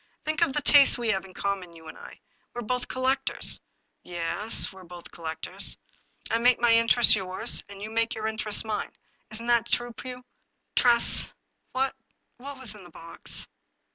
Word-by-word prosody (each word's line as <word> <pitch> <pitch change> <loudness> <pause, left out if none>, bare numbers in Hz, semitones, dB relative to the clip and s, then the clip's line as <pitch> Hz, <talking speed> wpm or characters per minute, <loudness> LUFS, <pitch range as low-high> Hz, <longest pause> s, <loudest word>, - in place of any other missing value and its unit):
Think 310 +2 -2
of 330 -5 +2
the 295 - -2
tastes 285 -1 +7
we 235 -2 0
have 190 -2 -3
in 185 -1 -16
common, 190 -4 -4
you 160 -1 -14
and - - -10
I. - - -14 0.3
We're 240 - -5
both 250 +3 -3
collectors." 265 +1 -2 0.2
" - - -50
Ye 175 - -11
es, 195 +6 +3
we're 190 -1 -14
both 175 0 -12
collectors." 160 -1 -5 0.3
" - - -15
I 230 - +1
make 245 +1 +4
my 240 -1 +4
interests 230 +1 +5
yours, 185 -2 0
and 200 0 -11
you 215 - -7
make 230 0 0
your 220 -1 -6
inter 220 -1 -4
ests 210 - +2
mine. 215 -1 -4 0.4
Isn't 230 +1 -8
that 235 -1 +2
so, 240 0 -1
Pugh? 250 +1 -9 0.2
" - - -51
" - - -51
Tress, 240 -1 +4 0.4
what 265 +1 -1 0.3
— - - -30
^what 280 +1 -9
was 255 -6 -3
in 210 -3 -14
the 175 - -14
box 165 0 -8
225 Hz, 200 wpm, -26 LUFS, 190-250 Hz, 0.4 s, tastes